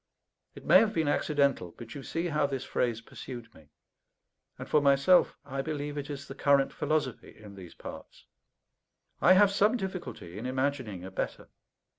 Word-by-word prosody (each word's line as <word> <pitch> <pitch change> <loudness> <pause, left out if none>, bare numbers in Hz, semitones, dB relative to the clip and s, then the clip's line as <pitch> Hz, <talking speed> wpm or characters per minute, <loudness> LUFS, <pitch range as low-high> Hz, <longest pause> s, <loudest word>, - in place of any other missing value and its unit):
It - - -12
may - - +8
have 215 -1 +1
been 160 -2 +1
accidental, 140 - +1
but 115 -1 -9
you 145 - -7
see 165 +5 -3
how 150 -2 +1
this 135 -2 -4
phrase 115 -2 -1
pursued 115 -1 -9
me; 75 -2 -19 0.9
and - - -8
for 150 - +3
myself, 140 +6 +4
I 135 -1 -3
believe 145 0 -4
it 145 0 -5
is 140 -1 -6
the - - -7
current 140 0 +2
philosophy 155 -6 -2
in 105 -2 -12
these 95 -3 -12
parts. - - -11 1.0
I 185 - +7
have 200 +1 +6
some 210 +4 +3
difficulty 170 - -6
in 120 - -4
imagining 130 -8 -2
a 95 - -8
better. - - -4
140 Hz, 170 wpm, -29 LUFS, 120-155 Hz, 1.0 s, may